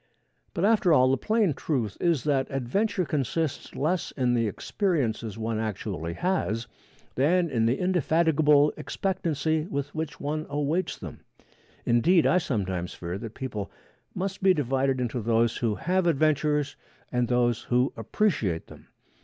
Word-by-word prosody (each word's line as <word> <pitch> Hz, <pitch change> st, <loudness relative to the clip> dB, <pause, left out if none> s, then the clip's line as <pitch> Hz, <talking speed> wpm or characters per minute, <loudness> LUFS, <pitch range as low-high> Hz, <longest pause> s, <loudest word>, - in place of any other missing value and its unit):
But 170 Hz, -, +1 dB
after 210 Hz, -5 st, +4 dB
all, 130 Hz, -4 st, +5 dB
the -, -, +4 dB
plain 215 Hz, -, +1 dB
truth 125 Hz, -7 st, -2 dB
is 165 Hz, -8 st, +2 dB
that 140 Hz, -3 st, +1 dB
adventure 185 Hz, -, 0 dB
consists 150 Hz, +1 st, -2 dB
less 170 Hz, +5 st, 0 dB
in 125 Hz, -2 st, 0 dB
the 115 Hz, -2 st, +2 dB
experiences 115 Hz, -, -1 dB
one 110 Hz, 0 st, -2 dB
actually 85 Hz, -6 st, -3 dB
has 115 Hz, -, -1 dB, 0.5 s
than 170 Hz, +5 st, +2 dB
in 115 Hz, -2 st, +2 dB
the 120 Hz, -, +1 dB
indefatigable 160 Hz, -4 st, +3 dB
expectancy 160 Hz, -2 st, -1 dB
with 140 Hz, -4 st, -3 dB
which 160 Hz, -1 st, -4 dB
one 155 Hz, +2 st, -3 dB
awaits 150 Hz, +5 st, -1 dB
them. -, -, -9 dB, 0.7 s
Indeed, 160 Hz, +9 st, +4 dB
I 180 Hz, -, +4 dB
sometimes 95 Hz, -, -3 dB
fear 90 Hz, +2 st, -5 dB
that 115 Hz, 0 st, -8 dB
people 105 Hz, -7 st, -5 dB, 0.5 s
must 195 Hz, +1 st, -3 dB
be 190 Hz, -1 st, +5 dB
divided 135 Hz, -1 st, 0 dB
into 125 Hz, -1 st, -2 dB
those 115 Hz, +1 st, +2 dB
who 115 Hz, -3 st, 0 dB
have 185 Hz, -, 0 dB
adventures 150 Hz, -2 st, +1 dB, 0.4 s
and 125 Hz, -1 st, +1 dB
those 120 Hz, -1 st, +1 dB
who 125 Hz, +1 st, +1 dB
appreciate 115 Hz, -, 0 dB
them. -, -, -15 dB
140 Hz, 145 wpm, -27 LUFS, 115-170 Hz, 0.7 s, all